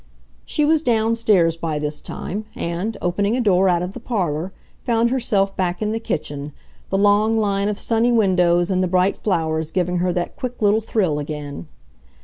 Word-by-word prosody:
She 300 - 0
was 315 0 +3
downstairs 220 - +2
by 165 -2 -3
this 150 0 -3
time, 210 +3 -5
and, 175 +7 -3
opening 200 +6 +1
a - - 0
door 195 -5 +3
out 175 -1 +2
of 180 +2 -5
the - - -7
parlor, 185 -7 -2 0.3
found 235 0 +1
herself 205 -6 +1
back 180 -1 -1
in 215 -1 -1
the 225 - -1
kitchen, 145 -8 -4 0.4
the 195 - 0
long 205 +2 +3
line 200 -1 +1
of 210 - -3
sunny 230 +2 +1
windows 180 -5 +3
and 185 0 +1
the 185 - +1
bright 185 +2 +2
flowers 160 -5 -1
giving 180 0 0
her 180 +1 +1
that 175 0 -3
quick 250 -1 -5
little 210 +1 +3
thrill 190 -9 0
again. 145 - -6
195 Hz, 180 wpm, -21 LUFS, 170-220 Hz, 0.4 s, was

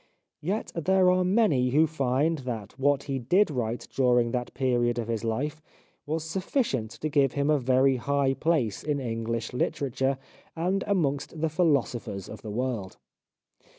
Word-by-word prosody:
Yet 190 +8 -2
there 185 +2 +3
are 185 0 +2
many 180 - +3
who 150 +5 +4
find 150 +1 0
that 115 -6 -5
what 140 0 +2
he 135 -2 -3
did 175 - +3
write 120 -3 -3
during 125 -3 +3
that 125 0 -2
period 120 -2 +1
of 115 -2 -2
his 115 -2 -2
life 145 +8 -2 0.5
was 155 +1 -1
sufficient 160 - -1
to 155 - 0
give 140 -3 +2
him 140 +1 +1
a 150 - +3
very 130 +1 +3
high 140 +1 +1
place 140 - 0
in 150 -1 0
Enghsh 115 -2 -3
literature 130 +1 0 0.4
and 185 +4 0
amongst 155 -5 0
the 160 +1 +1
philosophers 140 - 0
of - - -9
the 110 - -7
world. 115 -3 -3
135 Hz, 155 wpm, -27 LUFS, 120-160 Hz, 0.5 s, who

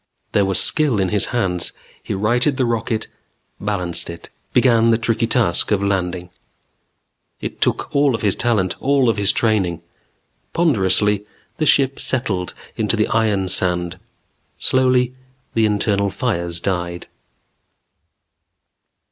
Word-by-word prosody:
There 100 - +2
was 95 -1 +1
skill 145 -9 +2
in 95 -1 +1
his 105 0 +2
hands. 95 -8 0 0.3
He - - -4
righted 120 +7 +1
the 130 - +1
rocket, 115 -1 -1 0.5
balanced 90 -6 -2
it. 85 0 -9 0.2
Began 115 -3 +4
the 115 - +4
tricky 115 0 0
task 110 -7 +1
of 100 -2 +1
landing. 90 -3 -2 1.1
It - - -7
took - - 0
all 140 -3 +3
of - - -6
his 100 -2 +2
talent, 110 -7 0
all 135 -3 +3
of 115 - 0
his 100 -1 +3
training. 95 -7 0 0.7
Ponderously, 105 - +2 0.3
the 155 - 0
ship 135 -1 +3
settled 100 -9 -2 0.2
into - - 0
the - - 0
iron 105 -4 +1
sand; 90 -1 +1 0.6
slowly, 130 -1 +2 0.4
the 110 -1 +3
internal 100 -1 +1
fires 85 -7 -2
died. 85 -1 -3
105 Hz, 130 wpm, -20 LUFS, 95-120 Hz, 1.1 s, Began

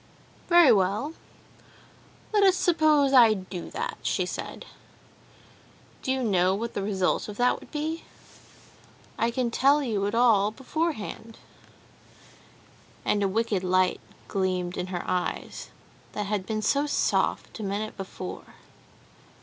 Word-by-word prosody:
"Very 345 -6 +7
well, 210 - +1 1.2
let 420 - +4
us 385 -2 +5
suppose 310 -6 +3
I 230 -4 +7
do 185 -2 -7
that," 485 +2 -4
she - - 0
said. - - -6 1.4
"Do 260 - -2
you 265 -1 0
know 190 -4 +2
what 230 +3 -4
the - - -2
result 195 0 0
of 205 - -8
that 245 0 +2
would - - -15
be? 315 +2 -3 1.2
I 230 - +2
can 240 0 -1
tell 280 +4 +3
you 205 -6 -1
it 205 - -2
all 225 -4 +4
beforehand," 230 -4 -4 1.7
and 205 - +1
a 200 - +2
wicked 205 -1 0
light 185 0 +2 0.3
gleamed 185 -2 -1
in 180 - -3
her 180 -2 -4
eyes, 180 -1 -3 0.4
that 210 - -3
had 200 -2 -2
been 215 -1 -2
so 285 +6 +2
soft 290 - 0
a - - -4
minute 205 +2 -3
before. 185 -1 -8
215 Hz, 135 wpm, -26 LUFS, 195-275 Hz, 1.7 s, Very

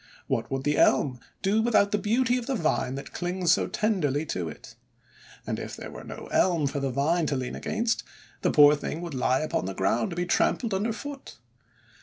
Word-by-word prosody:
What - - -2
would 135 0 -2
the 145 0 +1
Elm 130 -2 +3 0.2
do 205 +3 +3
with 235 0 0
out 200 -1 +5
the 210 - +1
beauty 245 +4 +2
of 235 - -8
the 270 - 0
vine 155 - 0
that 140 - -8
clings 180 -1 0
so - - +3
tenderly 160 -9 0
to 90 - -3
it? 75 - -11 0.7
And - - -3
if - - -6
there - - -8
were - - -9
no - - -8
Elm 170 -5 +3
for 140 +1 -1
the 135 -1 -1
vine 155 +6 +1
to 140 - 0
lean 130 -1 -3
against, 225 +1 -1 0.4
the - - +2
poor 145 0 +7
thing 150 +2 -5
would 170 -3 -6
lie 130 +1 +1
upon 155 - -1
the 95 0 -4
ground 110 +5 +1
to - - -6
be 175 +1 -1
trampled 220 +4 +1
under 205 +4 0
foot! 275 +5 -8
165 Hz, 215 wpm, -27 LUFS, 135-210 Hz, 0.7 s, poor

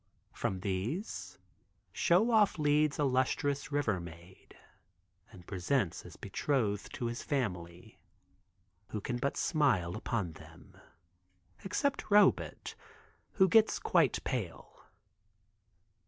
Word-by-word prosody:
From 95 -1 -3
these 105 - -4 0.5
Show 195 +8 +3
Off 215 -5 +4
leads 150 -1 +2
a 150 - +1
lustrous 140 +2 0
river 130 -10 0
maid 85 +2 -13 0.7
and 90 -2 -14
presents 95 - -1
as - - -12
betrothed 110 -8 -1
to 120 - -4
his 120 0 -3
family, 90 - -4 0.9
who 105 - -4
can 120 +4 -3
but 140 +3 -2
smile 115 - +1
upon 100 -9 -2
them, - - -15 0.9
except 275 +8 -1
Robet 205 -1 +3 0.6
who 190 -2 +4
gets 220 +3 +4
quite 165 -7 +2
pale. 110 -11 -5
130 Hz, 105 wpm, -32 LUFS, 95-150 Hz, 0.9 s, Off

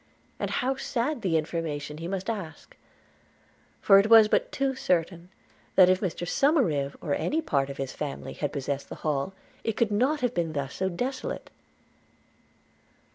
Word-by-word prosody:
and - - -2
how 260 +2 0
sad 255 +1 -2
the 170 -4 +2
information 155 -2 -3
he 165 - -5
must 190 0 -4
ask! 190 -9 -6 1.0
for 195 -1 +7
it 205 +2 +2
was 225 -2 +9
but - - +1
too 275 -1 0
certain 175 -6 -1 0.5
that, 185 -1 +7
if 185 0 +3
Mr 175 -3 -2
Somerive, 175 - +2
or 145 - -1
any 310 - 0
part 140 - 0
of 140 - -7
his 135 -1 -3
family, 145 -2 -5
had 145 - -3
possessed 140 0 -3
the - - -6
Hall, 150 +5 -1 0.3
it 225 - -2
could 225 -3 +2
not 260 +9 +1
have 245 -1 0
been 165 -2 -1
thus 140 -2 -4 0.2
desolate. 260 +5 -4
185 Hz, 160 wpm, -27 LUFS, 150-235 Hz, 1.0 s, was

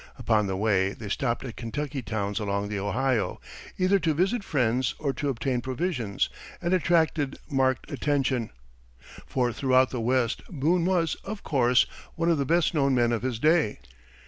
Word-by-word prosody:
Upon 105 -3 +1
the 95 -1 -2
way 100 -2 +2
they 110 -3 -8
stopped 120 +4 -1
at 120 - -7
Kentucky 140 +4 -4
towns 105 -3 -2
along 100 -1 -2
the 105 -1 -2
Ohio, 105 0 0 0.4
either 190 +2 +3
to 160 -4 0
visit 195 +7 +1
friends 125 -5 0
or 140 -3 -1
to 145 0 -2
obtain 130 -1 -1
provisions, 130 - -1 0.3
and 175 +1 -1
attracted 160 -5 +2
marked 130 -3 +1
attention, 135 -5 0 0.8
for 125 -2 0
throughout 130 0 +3
the 125 - -3
West 125 0 +1
Boone 165 +2 +1
was, 175 -3 +2
of 210 +1 -6
course, 125 -3 +3 0.3
one 165 +1 +1
of 160 - +1
the 140 - +1
best 170 +2 +2
known 140 -4 +2
men 120 -1 +3
of 115 - 0
his 125 -2 -2
day. 155 -4 +2
130 Hz, 170 wpm, -27 LUFS, 115-155 Hz, 0.8 s, either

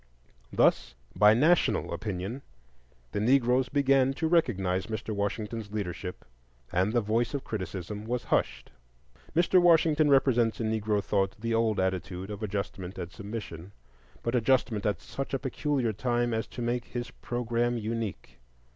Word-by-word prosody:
Thus, - - +2 0.2
by 105 +3 +6
national 160 +8 +3
opinion, 105 +4 -4 0.7
the - - -2
Negroes 125 +2 +3
began 135 -2 +3
to 160 - -1
recognize 95 - +1
Mr. 110 0 -4
Washington's 105 +1 -3
leadership; 90 -3 -5 0.5
and 95 +4 +1
the 120 0 +2
voice 115 +5 0
of 140 - -3
criticism 105 0 -5
was 120 +1 -2
hushed. - - -1 0.6
Mr. 175 +2 +4
Washington 160 -3 +4
represents 125 -5 +3
in 110 -1 0
Negro 105 -2 0
thought 95 -1 0
the 115 +1 -2
old 115 -2 +2
attitude 95 +1 -2
of 105 - -6
adjustment 100 -3 -4
and 90 -2 -5
submission; 100 -4 -7 0.5
but 115 - -1
adjustment 120 -3 +2
at 105 - 0
such 135 0 -5
a - - +2
peculiar 135 -3 -1
time 120 +2 0
as 110 0 -1
to 120 - -6
make 120 +1 -1
his 120 0 -5
programme 120 0 -1
unique. 110 - -4
115 Hz, 145 wpm, -28 LUFS, 100-125 Hz, 0.7 s, by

